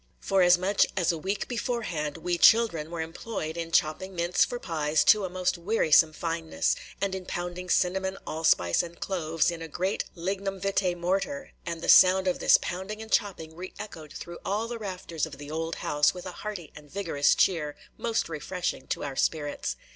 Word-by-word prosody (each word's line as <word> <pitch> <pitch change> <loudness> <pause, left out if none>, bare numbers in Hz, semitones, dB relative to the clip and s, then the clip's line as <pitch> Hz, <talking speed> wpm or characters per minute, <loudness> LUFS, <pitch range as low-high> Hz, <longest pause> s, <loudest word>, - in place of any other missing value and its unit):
For 195 -1 +2
as 180 0 +6
much 195 +3 +2
as 175 -3 +3
a 165 - -3
week 195 +4 -2
beforehand, 225 - -2
"we 175 +2 -1
children" 210 -10 +5
were 170 -1 -4
employed 160 0 -5
in 165 -1 -4
chopping 175 +5 +1
mince 170 +1 +2
for 245 - -2
pies 155 -6 0
to 210 -2 +5
a - - -4
most 180 -1 -1
wearisome 170 -5 +4
fineness, 165 0 -1 0.2
and 195 -1 -1
in 190 -1 -5
pounding 175 +1 -4
cinnamon, 190 +2 +1
allspice, 120 - +2
and 170 0 -9
cloves 165 -3 0
in 170 -1 -7
a 165 - -5
great 185 +5 -2
lignum 195 +2 -3
vitæ 190 -2 0
mortar; 195 +11 -2 0.2
and 170 -1 -4
the - - -3
sound 185 +1 +7
of 180 - 0
this - - +6
pounding 190 +4 -5
and 220 0 -9
chopping 160 -6 0
re 185 +2 -8
echoed 160 -8 -9
through 170 +2 -8
all 210 +4 -1
the 235 0 -5
rafters 180 -6 -4
of 145 -3 -11
the 145 +1 -9
old 165 +1 -3
house 150 +1 +3
with 180 - -8
a 185 - -5
hearty 200 -8 -6
and 150 -1 -13
vigorous 165 -7 +1
cheer, 155 -6 +1 0.2
most 230 0 -1
refreshing 165 -2 -4
to - - -2
our 140 -2 -4
spirits. 145 - -1
175 Hz, 190 wpm, -27 LUFS, 160-195 Hz, 0.2 s, sound